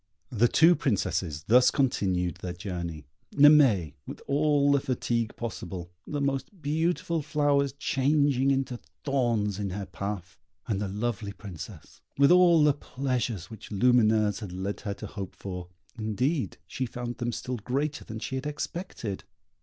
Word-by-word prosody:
The 120 0 +4
two 165 +7 +6
Princesses 90 - -1
thus 125 +7 +6
continued 95 -9 0
their 90 -1 -5
journey, 85 -4 -5 0.3
Naimée 140 - +6
with - - -7
all 145 0 +3
the 140 - +4
fatigue 120 -3 -1
possible, 95 -6 -6 0.2
the 145 - -2
most 140 +7 -2
beautiful 165 +2 0
flowers 145 -2 +1
changing 140 -1 +2
into 135 -3 0 0.2
thorns 115 -8 0
in 100 -1 -2
her 100 +2 -4
path; 95 0 -6 0.3
and 100 -2 -1
the 105 - -1
lovely 105 0 -3
Princess, 95 -6 -10 0.2
with 140 +3 +6
all 175 -3 +6
the 150 -1 +5
pleasures 125 - -3
which 110 - -10
Lumineuse 110 -1 +3
had 105 -6 -7
led 95 +2 -4
her 100 -3 -3
to 105 - -8
hope 100 -2 -7
for, 90 -2 -6 0.3
indeed, 125 - -1
she 130 - -3
found 120 0 -6
them 120 0 -1
still 125 +2 -4
greater 140 +7 -2
than 110 - -7
she 115 - -5
had 130 +2 -2
expected. 150 - -5
120 Hz, 150 wpm, -28 LUFS, 100-140 Hz, 0.3 s, two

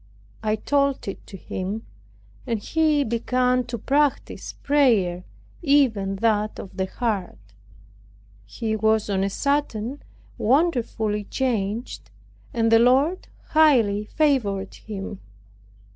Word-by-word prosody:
I 215 -1 +1
told 280 +2 0
it 195 - -7
to 195 - -9
him; 190 +4 -5 0.6
and 230 -2 0
he 305 +6 +1
began 250 +2 +1
to 235 0 -5
practice 285 +5 0
prayer, 220 -12 +2 0.4
even 250 - +2
that 215 0 0
of 190 - -9
the 190 -1 -1
heart. 190 - -4 0.9
He 220 - -3
was 220 -1 +1
on 190 -1 +1
a 195 - 0
sudden 280 0 -1 0.4
wonderfully 230 -6 +1
changed, 220 - -2 0.4
and 225 -1 +1
the 225 - +7
Lord 270 +10 +3 0.2
highly 235 -10 +4
favored 215 -9 0
him. 200 -2 -7
225 Hz, 110 wpm, -24 LUFS, 200-275 Hz, 0.9 s, the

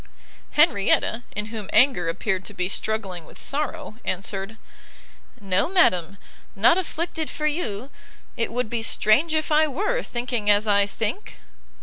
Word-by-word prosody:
Henrietta, 240 - +3
in 210 0 -1
whom 215 -3 -6
anger 250 -11 +4
appeared 190 +2 -2
to - - -9
be 180 - -1
struggling 195 -3 -3
with - - -15
sorrow, 295 -4 -3
answered, 195 +3 -4 0.8
"No, 195 - 0
madam, 200 - +2 0.4
not 225 +11 +5
afflicted 330 -2 -3
for 305 - -4
you! 275 - -2 0.4
it 230 - -1
would 245 0 -1
be 230 +1 -2
strange 265 +8 +3
if 310 0 -1
I 310 +1 +4
were, 420 - -1
thinking 240 - -2
as 205 +1 +5
I 200 -1 +3
think!" 225 - -4
225 Hz, 140 wpm, -24 LUFS, 200-305 Hz, 0.8 s, not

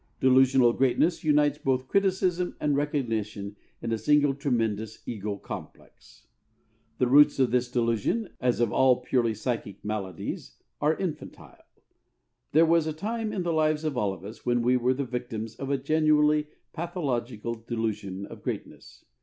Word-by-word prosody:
Delusional 130 -2 +5
greatness 135 +7 +1
unites 150 -1 +3
both 130 -1 0
criticism 185 -1 +1
and 145 -1 +1
recognition 110 -8 -2 0.3
in 115 - -2
a 115 - 0
single 145 +4 +3
tremendous 110 -6 -2
ego 105 -3 -4
complex. - - -11 0.7
The - - +2
roots 145 +4 +6
of 130 -4 +2
this 125 0 +1
delusion, 120 - 0
as 125 -2 +1
of 120 -4 +1
all 130 -1 +4
purely 115 -4 +1
psychic 110 -6 -4
maladies, 100 -5 -5 0.3
are 150 +2 +2
infantile. 180 -5 -6 0.9
There 160 +3 +5
was 165 -1 +3
a 155 - -2
time 220 +6 -3
in 185 - -2
the 170 -1 0
lives 155 -1 +1
of 155 -3 -2
all 105 -5 0
of 95 -1 -9
us 110 +3 -10
when 120 -1 +1
we 125 +1 +3
were 125 +1 +2
the 140 +1 -2
victims 115 -3 -5
of 135 - -5
a 140 - +1
genuinely 150 +1 +3 0.3
pathological 130 - -3
delusion 110 -4 -4
of - - -11
greatness. - - -7
130 Hz, 155 wpm, -27 LUFS, 115-150 Hz, 0.9 s, roots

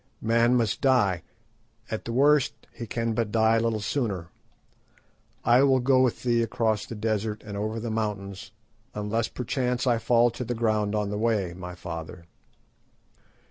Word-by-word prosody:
Man 115 +2 +3
must 115 -4 0
die. 110 -10 +3 0.7
At 110 - -4
the 115 - -4
worst 140 +2 +3 0.2
he 115 - -7
can 115 +1 -1
but 110 -2 -1
die 110 0 +3
a - - +3
little 115 -1 0
sooner. 100 -8 -2 1.2
I 120 +2 +6
will 135 -1 +4
go 130 +1 +3
with 125 -3 0
thee 120 -1 +2
across 115 -2 0
the 115 - -6
desert 110 0 -2
and 105 -1 -7
over 110 +2 -2
the 115 0 -4
mountains, 100 -3 -4 0.4
unless 105 +2 -1
perchance 125 0 -2
I 120 -3 +2
fall 120 +1 +3
to 120 +2 -5
the 120 0 -3
ground 110 -2 0
on 105 -1 -1
the 105 - -2
way, 105 -6 0
my 90 0 -8
father." 85 -1 -7
115 Hz, 165 wpm, -26 LUFS, 105-120 Hz, 1.2 s, I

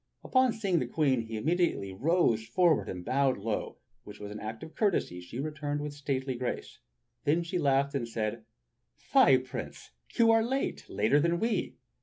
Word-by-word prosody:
Upon 255 -1 +3
seeing 195 -6 0
the 125 - -2
Queen, 135 -2 +1
he 110 0 -4
immediately 160 - 0
rode 140 - +2
forward 155 +8 +2
and 90 -1 -6
bowed 135 0 +2
low, 105 +1 -3 0.3
which 105 0 -11
act 110 +2 -6
of 160 - -10
courtesy 170 - 0
she 90 +8 -8
returned 145 0 -3
with 145 0 -4
stately 135 -2 -2
grace. 125 0 -5 0.4
Then 160 +4 +2
she 175 +2 -2
laughed 140 -2 +2
and 125 -4 -2
said: 110 0 -3 0.5
"Fie, - - +5
Prince, - - -7 0.2
you 230 -1 +5
are 225 0 +5
late, 265 +4 -2
later 110 +8 +2
than 170 +3 +1
we!" 225 -1 -1
140 Hz, 165 wpm, -30 LUFS, 115-170 Hz, 0.5 s, Fie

